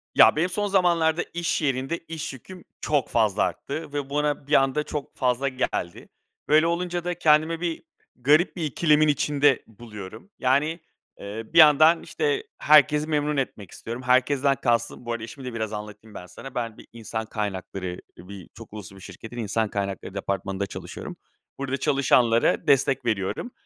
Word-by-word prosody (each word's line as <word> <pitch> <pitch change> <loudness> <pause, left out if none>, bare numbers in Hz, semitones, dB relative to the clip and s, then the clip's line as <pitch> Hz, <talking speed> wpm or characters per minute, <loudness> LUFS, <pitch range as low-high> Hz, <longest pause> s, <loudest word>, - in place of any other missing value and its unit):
Ya, - - +7
benim 170 +4 +1
son 205 +3 -1
zamanlarda 175 -4 +2
iş 170 -1 -1
yerinde 135 +3 -1
iş 160 -3 -7
yüküm 180 +8 -12 0.2
çok 145 -5 0
fazla 110 -3 +2
arttı 140 - -4
ve 145 -2 -3
buna 145 -1 -1
bir 150 - -3
anda 135 +1 +3
çok 150 -1 -6
fazla 125 +1 +1
geldi. 130 -9 -3 0.4
Böyle 155 +2 +5
olunca 175 0 -2
da 180 0 -2
kendimi 160 0 +2
bir 170 -2 -3 0.3
garip 150 +7 +3
bir 175 - -4
ikilemin 155 +1 +3
içinde 145 -1 +2
buluyorum. 110 - -11
Yani, 145 +6 +1 0.4
ııı, 110 +6 -7
bir - - +1
yandan, 155 +2 +7
işte, 150 -3 -1
herkesi 150 0 +5
memnun 150 -1 0
etmek 110 -8 -4
istiyorum. 115 +2 -7
Herkesten 135 +2 +3
kastım 120 -1 -1
Bu 120 - -3
arada, 115 -1 -3
işimi 130 +4 -9
de 125 - -5
biraz 110 -1 -3
anlatayım 105 +1 -8
ben 90 - -8
sana. 125 +9 -11
Ben 115 -3 -3
bir - - -14
insan 110 -1 -5
kaynakları 95 -4 -5 0.2
bir 95 +1 -11
çok 115 -1 -13
uluslu 100 -2 -9
bir 95 - -14
şirketin 110 +6 -10
insan 110 -1 -1
kaynakları 100 -2 -4
departmanında 100 0 -3
çalışıyorum. - - -8 0.4
Burada 135 0 -2
çalışanlara 125 0 +2
destek 135 -2 +3
veriyorum. 110 - -2
135 Hz, 160 wpm, -25 LUFS, 110-150 Hz, 0.4 s, Ya